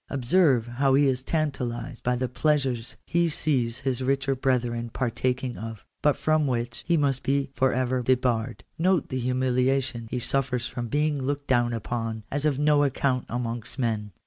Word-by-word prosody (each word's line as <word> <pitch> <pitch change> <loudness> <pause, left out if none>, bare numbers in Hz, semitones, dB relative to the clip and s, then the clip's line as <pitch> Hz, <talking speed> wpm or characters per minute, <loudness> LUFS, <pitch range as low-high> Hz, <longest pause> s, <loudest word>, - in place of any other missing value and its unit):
Observe 135 -2 +3
how 130 +3 +2
he 145 +1 +5
is 130 -2 +1
tantalized 130 -5 -3
by 125 0 +1
the 130 +1 -1
pleasures 130 -2 0
he 170 0 +2
sees 130 -6 0
his 130 -1 -1
richer 135 +1 +1
brethren 120 -3 0
partaking 125 +1 -2
of, 110 -1 -7 0.2
but 150 -1 +3
from 155 -1 +2
which 120 -2 -2
he 170 -1 +3
must 140 -3 +1
be 135 0 0
for 130 0 +2
ever 130 0 0
debarred. 125 -2 0 0.2
Note 180 -2 +2
the 130 - -2
humiliation 125 -1 0
he 125 - -2
suffers 125 0 -1
from 120 -1 -4
being 145 +2 0
looked 140 +2 -2
down 120 -3 +2
upon 115 -1 -3
as 145 +2 +1
of 140 -3 0
no 150 0 +4
account 130 -2 0
amongst 120 0 -4
men. 110 -5 -1
130 Hz, 170 wpm, -26 LUFS, 120-140 Hz, 0.2 s, he